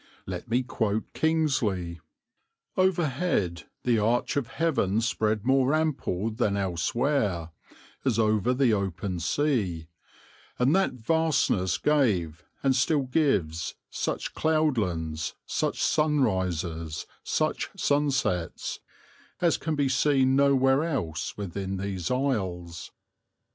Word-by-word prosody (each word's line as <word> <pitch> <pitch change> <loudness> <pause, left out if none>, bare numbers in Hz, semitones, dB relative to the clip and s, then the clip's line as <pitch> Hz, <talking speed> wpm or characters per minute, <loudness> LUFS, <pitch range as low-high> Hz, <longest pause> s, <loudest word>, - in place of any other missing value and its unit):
Let - - -6
me 125 +3 +2
quote 110 -4 -2
Kingsley: 115 - 0 0.8
"Overhead 155 - +1 0.2
the 120 -3 +2
arch 115 +4 +1
of 140 -4 0
heaven 130 - +1
spread 110 -2 0
more 135 +2 +3
ample 130 - -1
than 105 -3 0
elsewhere, 95 - 0 0.5
as - - +1
over 110 0 +2
the 125 -2 +3
open 95 -2 -2
sea; 90 - 0 0.7
and 130 +7 +3
that 195 0 +2
vastness 130 - +1
gave, 95 - +1 0.2
and 135 -1 +3
still 140 +3 +2
gives, 110 - 0 0.2
such - - -3
cloudlands, 90 - 0
such - - -1
sunrises, 95 - 0 0.2
such - - -1
sunsets, 135 - 0 0.6
as 170 -2 +3
can 160 -1 -2
be 145 -2 +1
seen 130 0 +3
nowhere 135 0 +4
else 85 - -3
within 95 -1 -4
these 95 -2 -3
isles. 95 -11 -2
115 Hz, 105 wpm, -27 LUFS, 90-140 Hz, 0.8 s, nowhere